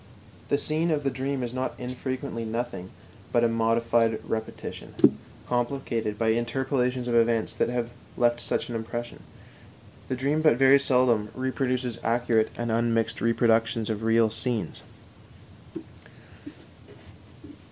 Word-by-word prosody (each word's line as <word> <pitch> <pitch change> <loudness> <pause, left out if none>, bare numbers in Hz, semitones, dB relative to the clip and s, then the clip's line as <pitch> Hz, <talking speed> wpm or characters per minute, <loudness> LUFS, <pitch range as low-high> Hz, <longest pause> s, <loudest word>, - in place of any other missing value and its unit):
The 140 - +3
scene 155 +3 +1
of 150 -2 0
the 135 - 0
dream 135 0 -2
is 120 0 -4
not 130 -2 -2
infrequently 125 -1 -4
nothing 110 -5 -4 0.4
but 120 - +3
a - - +5
modified 115 0 +2
repetition, 110 0 -5 0.5
complicated 120 -3 -1
by 115 0 +1
interpolations 125 +1 -1
of 120 - -1
events 115 -1 +2
that - - 0
have 120 -1 -2 0.3
left 120 0 +2
such - - -1
an 120 - -6
impression; 120 +1 -5 0.9
the 130 - 0
dream 140 +5 0
but 155 -6 +4
very 135 +1 +6
seldom 125 -6 +2
reproduces 130 -2 -1
accurate 115 -1 +1
and 120 -1 -2
unmixed 115 -1 0
reproductions 115 0 +2
of 105 0 -3
real 115 0 +3
scenes. 115 0 -2
120 Hz, 125 wpm, -26 LUFS, 115-130 Hz, 0.9 s, very